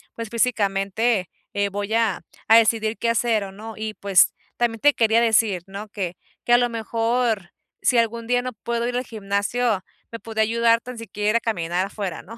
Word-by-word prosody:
pues, 230 Hz, -1 st, -6 dB
físicamente, 210 Hz, -3 st, +1 dB, 0.3 s
eh, 200 Hz, 0 st, 0 dB
voy 205 Hz, +2 st, -4 dB
a 225 Hz, -5 st, +1 dB, 0.3 s
a 225 Hz, -, +7 dB
decidir 225 Hz, -1 st, +2 dB
qué 230 Hz, -, 0 dB
hacer 230 Hz, -2 st, +1 dB
o 195 Hz, -, -9 dB
¿no? 220 Hz, +3 st, -9 dB
Y 215 Hz, 0 st, -4 dB
pues, 195 Hz, -2 st, +4 dB, 0.2 s
también 235 Hz, -2 st, 0 dB
te 290 Hz, +3 st, +5 dB
quería 225 Hz, -1 st, +3 dB
decir, 220 Hz, -5 st, +2 dB
¿no?, 200 Hz, +2 st, -8 dB
que 185 Hz, -4 st, -4 dB, 0.3 s
que 240 Hz, -, +3 dB
a -, -, +8 dB
lo 245 Hz, 0 st, +2 dB
mejor, 230 Hz, -3 st, -1 dB, 0.3 s
si 250 Hz, -, +3 dB
algún 230 Hz, 0 st, 0 dB
día 245 Hz, 0 st, +2 dB
no 255 Hz, 0 st, -4 dB
puedo 235 Hz, +2 st, -3 dB
ir 245 Hz, -, -3 dB
al 250 Hz, -, -2 dB
gimnasio, 205 Hz, +1 st, -1 dB, 0.3 s
me 230 Hz, -, -6 dB
podía 220 Hz, -1 st, -1 dB
ayudar 230 Hz, +1 st, +3 dB
tan 250 Hz, 0 st, -9 dB
siquiera 210 Hz, -1 st, -2 dB
ir -, -, -1 dB
a -, -, +1 dB
caminar 175 Hz, -6 st, -1 dB
afuera, 195 Hz, -4 st, -5 dB
¿no?, 230 Hz, +4 st, -12 dB
225 Hz, 200 wpm, -23 LUFS, 200-235 Hz, 0.3 s, a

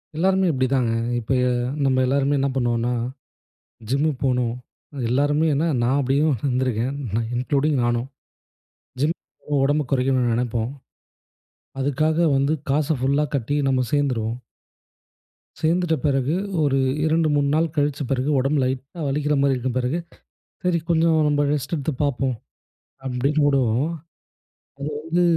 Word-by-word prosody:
எல்லாருமே 190 Hz, +2 st, +2 dB
இப்படிதாங்க. 130 Hz, -3 st, +1 dB, 0.3 s
இப்ப 115 Hz, +3 st, -6 dB
எ -, -, +2 dB, 0.4 s
நம்ப 130 Hz, -1 st, +2 dB
எல்லாருமே 140 Hz, +1 st, +2 dB
என்ன 140 Hz, 0 st, +1 dB
பண்ணுவோம்னா, 120 Hz, -1 st, 0 dB, 1.0 s
ஜிம்முக்கு 140 Hz, 0 st, 0 dB
போணும், 125 Hz, -2 st, +1 dB, 0.6 s
எல்லாருமே 145 Hz, +4 st, +2 dB
ஏன்னா, 160 Hz, +4 st, +1 dB, 0.2 s
நான் 130 Hz, +4 st, +2 dB
அப்படியும் 140 Hz, +2 st, +2 dB
வந்துருக்கேன், 130 Hz, -1 st, 0 dB, 0.4 s
இன்க்ளூடிங் 140 Hz, +2 st, +1 dB
நானும். 120 Hz, +1 st, 0 dB, 0.9 s
ஜிம் 155 Hz, +4 st, +2 dB, 0.4 s
உ -, -, +3 dB
உடம்பு 145 Hz, +1 st, +1 dB
குறைக்கும்னு 130 Hz, -2 st, +2 dB
நினைப்போம். 120 Hz, 0 st, -1 dB, 1.1 s
அதுக்காக 155 Hz, +4 st, +1 dB, 0.2 s
வந்து 140 Hz, +3 st, +2 dB, 0.2 s
காசை 150 Hz, +1 st, +1 dB
ஃபுல்லா 140 Hz, +3 st, +2 dB
கட்டி, 140 Hz, +4 st, -1 dB
நம்ப 130 Hz, -1 st, +2 dB
சேர்ந்துருவோம். 125 Hz, -5 st, 0 dB, 1.2 s
சேர்ந்துட்ட 165 Hz, +1 st, +2 dB
பிறகு, 135 Hz, +2 st, +1 dB, 0.3 s
ஒரு 135 Hz, -1 st, +2 dB, 0.3 s
2, 160 Hz, 0 st, +2 dB
3 140 Hz, -1 st, +2 dB
நாள் 160 Hz, 0 st, +1 dB
கழிச்ச 145 Hz, 0 st, 0 dB
பிறகு 135 Hz, +2 st, 0 dB
உடம்பு 140 Hz, +2 st, +1 dB
லைட்டா 135 Hz, +6 st, -4 dB
வலிக்கிற 150 Hz, +1 st, 0 dB
மாதிரி 140 Hz, -1 st, +3 dB
இருக்கும் 130 Hz, 0 st, -2 dB
பிறகு, 130 Hz, +8 st, -1 dB, 0.7 s
சரி, 180 Hz, -2 st, +2 dB
கொஞ்சம் 165 Hz, -1 st, +3 dB
நம்ப 145 Hz, 0 st, +2 dB
ரெஸ்ட் 145 Hz, +3 st, -2 dB
எடுத்து 145 Hz, 0 st, -2 dB
பாப்போம். 135 Hz, -3 st, -1 dB, 0.7 s
அப்படீன்னு 140 Hz, +4 st, +1 dB
விடுவோம். 135 Hz, +1 st, +2 dB, 1.0 s
அது 150 Hz, -, -5 dB
வந்து 175 Hz, +2 st, +1 dB
140 Hz, 125 wpm, -23 LUFS, 130-150 Hz, 1.2 s, உ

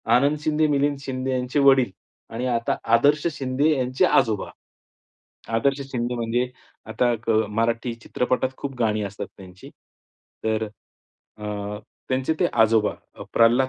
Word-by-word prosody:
आनंद 140 Hz, +4 st, +3 dB
शिंदे, 155 Hz, 0 st, +2 dB
मिलिंद 145 Hz, 0 st, +1 dB
शिंदे 130 Hz, -1 st, -3 dB
यांचे 125 Hz, +3 st, 0 dB
वडील 135 Hz, -5 st, +5 dB, 0.4 s
आणि 120 Hz, +3 st, -2 dB
आता 115 Hz, 0 st, 0 dB, 0.2 s
आदर्श 145 Hz, +6 st, +3 dB
शिंदे 135 Hz, +2 st, 0 dB
यांचे 130 Hz, 0 st, +2 dB
आजोबा. 110 Hz, -6 st, +2 dB, 1.1 s
आदर्श 140 Hz, +5 st, +1 dB
शिंदे 120 Hz, -1 st, -2 dB
म्हणजे 120 Hz, +1 st, -1 dB, 0.4 s
आता 120 Hz, +2 st, +1 dB
क -, -, -1 dB, 0.3 s
मराठी 115 Hz, +1 st, 0 dB
चित्रपटात 125 Hz, +2 st, -1 dB
खूप 140 Hz, -1 st, -5 dB
गाणी 110 Hz, -2 st, +1 dB
असतात 100 Hz, 0 st, -5 dB
त्यांची. 95 Hz, -1 st, -13 dB, 0.8 s
तर 110 Hz, 0 st, +1 dB, 0.7 s
अ, 105 Hz, -, -8 dB, 0.6 s
त्यांचे 130 Hz, +4 st, +1 dB
ते 175 Hz, -, +5 dB
आजोबा 110 Hz, -2 st, +3 dB, 0.4 s
प्रल्हाद 120 Hz, +3 st, +5 dB
125 Hz, 125 wpm, -24 LUFS, 115-135 Hz, 1.1 s, वडील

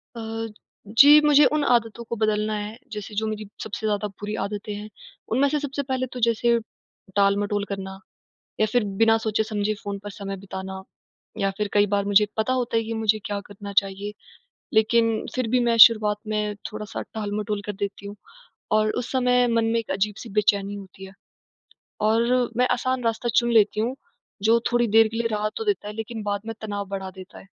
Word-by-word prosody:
अ, 225 Hz, 0 st, -4 dB, 0.5 s
जी, 295 Hz, +2 st, +10 dB
मुझे 295 Hz, -1 st, +6 dB
उन 300 Hz, -, +1 dB
आदतों 235 Hz, -3 st, +1 dB
को -, -, -2 dB
बदलना 215 Hz, -1 st, 0 dB
है। 210 Hz, +2 st, -6 dB
जैसे, 210 Hz, -1 st, -6 dB
जो 220 Hz, +2 st, 0 dB
मेरी 215 Hz, 0 st, -4 dB, 0.2 s
सबसे 220 Hz, +1 st, -5 dB
ज़्यादा 210 Hz, 0 st, 0 dB
बुरी 210 Hz, +1 st, -6 dB
आदतें 205 Hz, +1 st, -5 dB
हैं, 210 Hz, +1 st, -7 dB, 0.4 s
उनमें 265 Hz, +5 st, +3 dB
से 300 Hz, +1 st, 0 dB
सबसे 285 Hz, 0 st, -3 dB
पहले 260 Hz, 0 st, 0 dB
तो 250 Hz, -, -5 dB
जैसे 235 Hz, +1 st, +2 dB, 0.6 s
टाल-मटोल 205 Hz, 0 st, +2 dB
करना, 190 Hz, -1 st, -6 dB, 0.6 s
या 215 Hz, -, +4 dB
फिर 245 Hz, -3 st, +3 dB, 0.2 s
बिना 225 Hz, 0 st, +6 dB
सोचे-समझे 215 Hz, -1 st, 0 dB
फ़ोन 200 Hz, -1 st, -4 dB
पर 205 Hz, -, -5 dB
समय 200 Hz, -1 st, -6 dB
बिताना 190 Hz, 0 st, -7 dB, 0.6 s
या 195 Hz, -, +1 dB
फिर 210 Hz, -1 st, -1 dB
कई 205 Hz, 0 st, +4 dB
बार 200 Hz, 0 st, +2 dB
मुझे 205 Hz, +1 st, +5 dB
पता 220 Hz, +3 st, +1 dB
होता 240 Hz, -2 st, -1 dB
है 225 Hz, -, +2 dB
कि 225 Hz, -, -5 dB
मुझे 220 Hz, -1 st, +2 dB
क्या 205 Hz, -1 st, -3 dB
करना 205 Hz, 0 st, -9 dB
चाहिए, 200 Hz, +1 st, -7 dB, 0.6 s
लेकिन 225 Hz, 0 st, +2 dB
फिर 255 Hz, -2 st, 0 dB
भी 250 Hz, +2 st, +3 dB
मैं 230 Hz, -, +2 dB
शुरुआत 215 Hz, -3 st, +1 dB
में 210 Hz, -1 st, -1 dB, 0.2 s
थोड़ा-सा 210 Hz, +1 st, -6 dB
टाल-मटोल 210 Hz, -1 st, -3 dB
कर 210 Hz, -, -3 dB
देती 200 Hz, 0 st, -5 dB
हूँ, 205 Hz, -, -8 dB, 0.6 s
और 215 Hz, 0 st, +3 dB
उस 245 Hz, -, -8 dB
समय 250 Hz, -1 st, +3 dB
मन 230 Hz, -1 st, +2 dB
में -, -, +3 dB
एक 230 Hz, -, -6 dB
अजीब-सी 210 Hz, +4 st, -2 dB
बेचैनी 205 Hz, -1 st, +2 dB
होती 195 Hz, -1 st, -10 dB
है, 190 Hz, -, -13 dB, 0.9 s
और 235 Hz, +3 st, +2 dB
मैं 250 Hz, 0 st, +4 dB
आसान 255 Hz, 0 st, -1 dB
रास्ता 230 Hz, +1 st, -1 dB
चुन 240 Hz, 0 st, -1 dB
लेती 215 Hz, -1 st, +4 dB
हूँ, 240 Hz, +4 st, -1 dB, 0.5 s
जो 230 Hz, +2 st, +5 dB
थोड़ी 240 Hz, -1 st, +2 dB
देर 225 Hz, 0 st, +7 dB
के 225 Hz, +1 st, -6 dB
लिए 235 Hz, 0 st, +1 dB
राहत 215 Hz, -1 st, -2 dB
तो 450 Hz, -, -4 dB
देता 400 Hz, -, -1 dB
है, 210 Hz, -, -5 dB
लेकिन 225 Hz, -1 st, -5 dB
बाद 205 Hz, -1 st, -2 dB
में 225 Hz, -, -3 dB
तनाव 205 Hz, -2 st, -4 dB
बढ़ा 190 Hz, -1 st, -4 dB
देता 190 Hz, 0 st, -11 dB
है। -, -, -15 dB
215 Hz, 195 wpm, -24 LUFS, 205-230 Hz, 0.9 s, जी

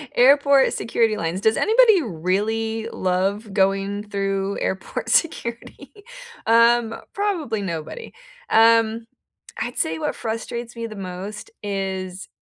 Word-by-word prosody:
airport 280 Hz, +1 st, +5 dB
security 230 Hz, -1 st, +1 dB
lines, 170 Hz, +1 st, -2 dB
does 220 Hz, +2 st, +2 dB
anybody 445 Hz, -3 st, +5 dB
really 220 Hz, -, -2 dB
love 195 Hz, +3 st, -1 dB
going 195 Hz, +1 st, +1 dB
through 195 Hz, -1 st, -2 dB
airport 190 Hz, 0 st, -3 dB
security? 235 Hz, -8 st, -1 dB, 0.5 s
Um, 230 Hz, 0 st, +4 dB, 0.2 s
probably 340 Hz, -, -1 dB
nobody, 170 Hz, -, -6 dB, 0.4 s
um, 225 Hz, 0 st, +4 dB, 0.5 s
I'd 240 Hz, -, -4 dB
say 160 Hz, 0 st, -1 dB
what -, -, -2 dB
frustrates 235 Hz, +1 st, -5 dB
me 230 Hz, 0 st, -5 dB
the 215 Hz, -2 st, -10 dB
most 195 Hz, -, -7 dB
is 190 Hz, -2 st, -4 dB
220 Hz, 110 wpm, -22 LUFS, 195-235 Hz, 0.5 s, airport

